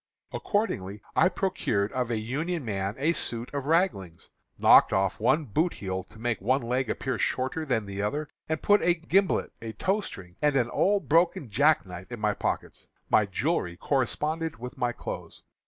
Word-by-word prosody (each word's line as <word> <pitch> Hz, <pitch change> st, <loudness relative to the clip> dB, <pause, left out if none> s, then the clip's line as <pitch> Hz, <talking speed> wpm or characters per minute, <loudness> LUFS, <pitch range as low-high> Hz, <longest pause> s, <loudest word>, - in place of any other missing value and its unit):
"Accordingly 105 Hz, -, -2 dB, 0.2 s
I 180 Hz, -, +5 dB
procured 110 Hz, -, -1 dB
of 125 Hz, -2 st, -2 dB
a 115 Hz, -, 0 dB
Union 145 Hz, +8 st, -3 dB
man 100 Hz, -1 st, -2 dB
a 155 Hz, +5 st, +2 dB
suit 120 Hz, -5 st, -2 dB
of 140 Hz, -1 st, -3 dB
raglings, 155 Hz, -, 0 dB, 0.3 s
knocked -, -, +7 dB
off 95 Hz, +2 st, +1 dB
one 150 Hz, +8 st, +2 dB
boot 155 Hz, -, 0 dB
heel 95 Hz, -1 st, -3 dB
to 110 Hz, -, -17 dB
make 115 Hz, -3 st, -2 dB
one 130 Hz, +6 st, +1 dB
leg 125 Hz, +1 st, -1 dB
appear 130 Hz, -1 st, -2 dB
shorter 130 Hz, +5 st, -1 dB
than 120 Hz, -7 st, 0 dB
the 100 Hz, 0 st, -5 dB
other, 145 Hz, +9 st, -2 dB, 0.2 s
and 160 Hz, -1 st, -2 dB
put 205 Hz, 0 st, +5 dB
a 175 Hz, 0 st, +3 dB
gimblet, 180 Hz, +4 st, +1 dB
a 115 Hz, -1 st, -6 dB
tow 195 Hz, -, 0 dB
string, 90 Hz, -, -10 dB
and 150 Hz, -1 st, +3 dB
an 120 Hz, -3 st, +1 dB
old 200 Hz, 0 st, +1 dB
broken 165 Hz, -6 st, +2 dB
jack 150 Hz, +4 st, +3 dB
knife 90 Hz, +3 st, -9 dB
in 120 Hz, -, -6 dB
my 105 Hz, 0 st, +1 dB
pockets. -, -, -4 dB, 0.2 s
My 105 Hz, -, +4 dB
jewelry 95 Hz, -, -1 dB
corresponded 150 Hz, -, -1 dB
with 125 Hz, +2 st, -7 dB
my 120 Hz, -1 st, 0 dB
clothes. -, -, -7 dB
125 Hz, 180 wpm, -27 LUFS, 105-160 Hz, 0.3 s, knocked